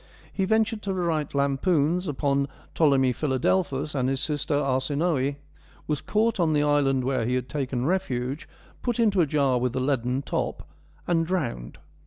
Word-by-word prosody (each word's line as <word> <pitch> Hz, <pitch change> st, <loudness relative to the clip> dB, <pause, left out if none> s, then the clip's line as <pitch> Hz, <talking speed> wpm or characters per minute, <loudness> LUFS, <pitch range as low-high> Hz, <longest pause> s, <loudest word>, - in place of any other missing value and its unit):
He 195 Hz, -, 0 dB
ventured 220 Hz, +1 st, +1 dB
to 195 Hz, -2 st, -2 dB
write 165 Hz, -6 st, -1 dB
lampoons 150 Hz, +5 st, +1 dB
upon 140 Hz, -1 st, 0 dB, 0.3 s
Ptolemy 135 Hz, -5 st, +3 dB
Philadelphus 145 Hz, +2 st, 0 dB
and 130 Hz, -2 st, 0 dB
his 135 Hz, 0 st, 0 dB
sister 145 Hz, +1 st, -1 dB
Arsinoe, 140 Hz, +1 st, 0 dB, 0.5 s
was 150 Hz, -2 st, -2 dB
caught 220 Hz, 0 st, +1 dB
on 165 Hz, -3 st, +2 dB
the 150 Hz, -1 st, +2 dB
island 140 Hz, -3 st, +2 dB
where 130 Hz, -2 st, 0 dB
he 125 Hz, +3 st, 0 dB
had 130 Hz, -1 st, -2 dB
taken 130 Hz, -4 st, -2 dB
refuge, 140 Hz, -6 st, -2 dB, 0.3 s
put 240 Hz, -1 st, -2 dB
into 205 Hz, -5 st, +3 dB
a 160 Hz, -, +2 dB
jar 140 Hz, -4 st, +2 dB
with 125 Hz, 0 st, -1 dB
a -, -, 0 dB
leaden 130 Hz, 0 st, 0 dB
top, -, -, -3 dB, 0.4 s
and 165 Hz, -2 st, +1 dB
drowned. 140 Hz, -, -3 dB
145 Hz, 160 wpm, -26 LUFS, 130-170 Hz, 0.5 s, Ptolemy